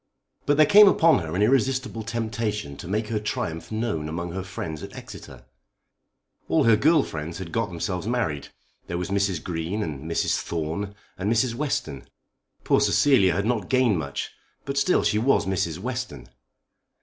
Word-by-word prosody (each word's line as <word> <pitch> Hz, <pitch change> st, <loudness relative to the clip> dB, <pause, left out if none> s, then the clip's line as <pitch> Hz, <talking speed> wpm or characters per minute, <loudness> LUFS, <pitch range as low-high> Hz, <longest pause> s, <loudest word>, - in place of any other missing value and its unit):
But 145 Hz, 0 st, +3 dB
there 155 Hz, -, +7 dB
came 210 Hz, 0 st, +8 dB
upon 165 Hz, -, +5 dB
her 80 Hz, -1 st, -5 dB
an 100 Hz, -, +2 dB
irresistible 130 Hz, 0 st, +1 dB
temptation 110 Hz, -7 st, -3 dB
to 85 Hz, -, -9 dB
make 105 Hz, +3 st, -2 dB
her 110 Hz, -2 st, 0 dB
triumph 85 Hz, -5 st, -4 dB
known 110 Hz, -9 st, -2 dB
among 85 Hz, +2 st, -4 dB
her 95 Hz, +2 st, -4 dB
friends 85 Hz, -5 st, -6 dB
at -, -, -9 dB
Exeter. -, -, -11 dB, 1.0 s
All -, -, +3 dB
her 115 Hz, -1 st, +6 dB
girl 150 Hz, +6 st, +4 dB
friends 80 Hz, +2 st, -6 dB
had 90 Hz, -3 st, -7 dB
got 115 Hz, +2 st, 0 dB
themselves 90 Hz, +2 st, -4 dB
married. 105 Hz, -, -1 dB, 0.4 s
There 85 Hz, -, -3 dB
was 90 Hz, +2 st, -4 dB
Mrs. 100 Hz, -4 st, 0 dB
Green, 90 Hz, +5 st, -3 dB
and 75 Hz, 0 st, -6 dB
Mrs. 85 Hz, -, +1 dB
Thorne, 85 Hz, +5 st, -4 dB, 0.2 s
and 100 Hz, +3 st, 0 dB
Mrs. 115 Hz, +1 st, +2 dB
Western. 115 Hz, -, -3 dB, 0.6 s
Poor -, -, +3 dB
Cecilia 120 Hz, -11 st, +4 dB
had 100 Hz, +2 st, 0 dB
not 110 Hz, -5 st, -1 dB
gained 125 Hz, -8 st, +3 dB
much, 70 Hz, -3 st, -4 dB, 0.3 s
but 140 Hz, -, -3 dB
still 140 Hz, +6 st, +2 dB
she 105 Hz, -, +2 dB
was 130 Hz, +5 st, +2 dB
Mrs. 85 Hz, -4 st, -1 dB
Western. 105 Hz, -, -5 dB
100 Hz, 170 wpm, -25 LUFS, 85-120 Hz, 1.0 s, came